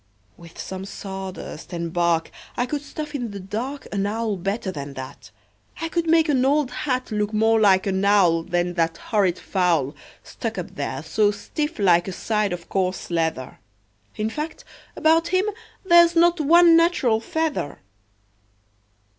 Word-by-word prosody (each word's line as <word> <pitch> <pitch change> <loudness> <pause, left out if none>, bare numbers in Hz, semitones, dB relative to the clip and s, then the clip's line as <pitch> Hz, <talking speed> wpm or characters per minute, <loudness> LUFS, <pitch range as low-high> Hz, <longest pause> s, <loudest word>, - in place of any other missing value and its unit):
"With 170 -1 -15
some 190 0 -6
sawdust 190 -4 -7
and 170 -1 -4
bark 170 -2 +1 0.3
I 245 - +1
could 285 +3 -3
stuff 300 +1 -7
in 245 -5 -3
the 200 -1 -7
dark 240 +9 -5
An 200 -1 -1
owl 220 0 -1
better 195 +2 -3
than 140 -4 -7
that. 130 0 -9 0.5
I 330 -1 -3
could 335 0 -1
make 325 0 +4
an 265 -4 +2
old 280 -1 +2
hat 255 -1 -2
Look 210 0 -1
more 225 +1 +3
like 195 -3 +4
an 190 -1 0
owl 190 -5 +4
Than 175 +1 -1
that 165 -1 0
horrid 195 -5 0
fowl, 170 -7 0 0.3
Stuck - - -5
up - - -5
there - - -4
so 210 -1 +2
stiff 295 +10 -4
like 175 -4 +3
a 190 - -4
side 210 0 -1
of 175 -1 -6
coarse 185 -2 -2
leather. 160 -6 -2 0.6
In 215 +1 -2
fact, 310 - -5 0.3
about 325 +1 +3
him 370 +2 +1 0.4
there's 345 -1 +6
not 340 0 +4
one 335 +3 +6
natural 330 -10 +3
feather." 310 - -2
210 Hz, 160 wpm, -23 LUFS, 180-295 Hz, 0.6 s, there's